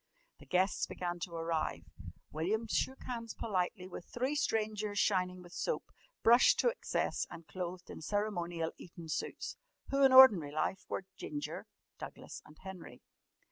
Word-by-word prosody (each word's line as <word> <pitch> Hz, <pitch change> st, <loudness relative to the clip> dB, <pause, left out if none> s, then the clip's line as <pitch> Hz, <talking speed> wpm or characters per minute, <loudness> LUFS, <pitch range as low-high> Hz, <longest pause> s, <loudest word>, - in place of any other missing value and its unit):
The -, -, -15 dB
guests 185 Hz, +1 st, +2 dB
began 175 Hz, -1 st, -4 dB
to 170 Hz, 0 st, -5 dB
arrive. 165 Hz, -1 st, -1 dB, 0.5 s
William 195 Hz, +9 st, 0 dB
shook 265 Hz, +5 st, -1 dB
hands 230 Hz, -3 st, -5 dB
politely 185 Hz, -3 st, -1 dB
with 180 Hz, -1 st, -8 dB
three 255 Hz, +4 st, -1 dB
strangers 215 Hz, -6 st, 0 dB
shining 185 Hz, -3 st, +1 dB
with 175 Hz, 0 st, -13 dB
soap, -, -, -2 dB, 0.3 s
brushed 235 Hz, +2 st, +7 dB
to 485 Hz, -, +4 dB
excess, 475 Hz, -, -1 dB
and 165 Hz, -, -10 dB
clothed 180 Hz, 0 st, -5 dB
in -, -, -8 dB
ceremonial 175 Hz, -4 st, -1 dB
Eton 170 Hz, -2 st, -10 dB
suits -, -, -3 dB, 0.3 s
who 275 Hz, 0 st, +3 dB
in 270 Hz, -, +7 dB
ordinary 215 Hz, -, +9 dB
life 185 Hz, +5 st, -1 dB
were 190 Hz, -, -3 dB
Ginger, 145 Hz, -1 st, -5 dB, 0.3 s
Douglas, -, -, -8 dB
and 150 Hz, -, -16 dB
Henry. 190 Hz, -2 st, -10 dB
185 Hz, 145 wpm, -34 LUFS, 170-220 Hz, 0.5 s, ordinary